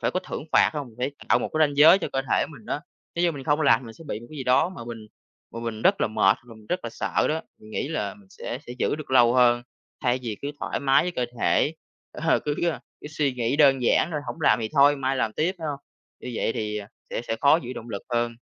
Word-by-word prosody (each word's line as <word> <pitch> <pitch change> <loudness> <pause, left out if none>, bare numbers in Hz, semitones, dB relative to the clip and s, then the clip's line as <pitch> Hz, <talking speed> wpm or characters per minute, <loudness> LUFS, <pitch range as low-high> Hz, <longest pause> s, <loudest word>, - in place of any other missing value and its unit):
Phải - - +1
có 185 - -1
thưởng - - -6
phạt, - - +5
hông? 145 -4 -4
Để 130 +3 -1 0.2
tạo 120 - +5
một - - -3
cái 155 0 +4
ranh 145 -1 -7
giới 165 +6 +8
cho - - -3
cơ 135 - 0
thể - - +3
mình 130 -9 -13
á. 145 - -2 0.3
Nếu 170 - 0
như 175 -1 +3
mình 140 -3 -8
không 150 0 +2
làm 135 -5 +5
thì - - -12
mình 115 - -9
sẽ 165 - -14
bị 110 -7 -5
một 120 - -12
cái 155 - -9
gì 130 - -4
đó 130 +7 +4
mà 185 -11 -9
mình 115 -2 -8 0.4
mà 115 - -7
mình 115 -2 -5
rất - - +3
là - - +3
mệt, 100 -1 +3
và 115 -2 -13
mình 110 -1 -17
rất 180 +7 -1
là 115 - -4
sợ - - 0
đó, 160 +1 0 0.2
mình 110 - -15
nghĩ 135 - -3
là 160 +5 -3
mình 205 -2 -20
sẽ 125 -9 -6
sẽ 120 - -6
giữ - - 0
được 155 -3 -9
lâu 120 -2 +6
hơn, 120 -1 +4 0.4
thay 125 0 +1
vì 110 -4 -4
cứ 140 - -2
thoải - - -3
mái 135 -1 +4
với 180 - -2
cơ 125 -8 -1 0.2
thể, 155 - +2 0.4
ờ, 165 +1 +1
cứ, 145 -1 -2 0.2
ơ, - - -5 0.2
cứ - - -9
suy 150 -2 0
nghĩ 125 +1 -1
đơn 135 -4 +5
giản 120 - +3
thôi 150 - -1
hổng 165 - -6
làm 145 - +4
thì 110 - -2
thôi 145 0 +5
mai 135 0 -1
làm 110 -4 0
tiếp, 170 - 0
phải 160 - -5
hông? 140 - -3 0.4
Như 125 - -6
vậy 115 - 0
thì, 105 -1 -3
ờ, 100 - -8 0.2
sẽ - - -3
sẽ 115 -1 -3
khó 140 +2 +6
giữ 125 +1 -6
động 120 - -8
lực 100 - -5
hơn. 120 0 0
130 Hz, 290 wpm, -25 LUFS, 115-150 Hz, 0.4 s, giới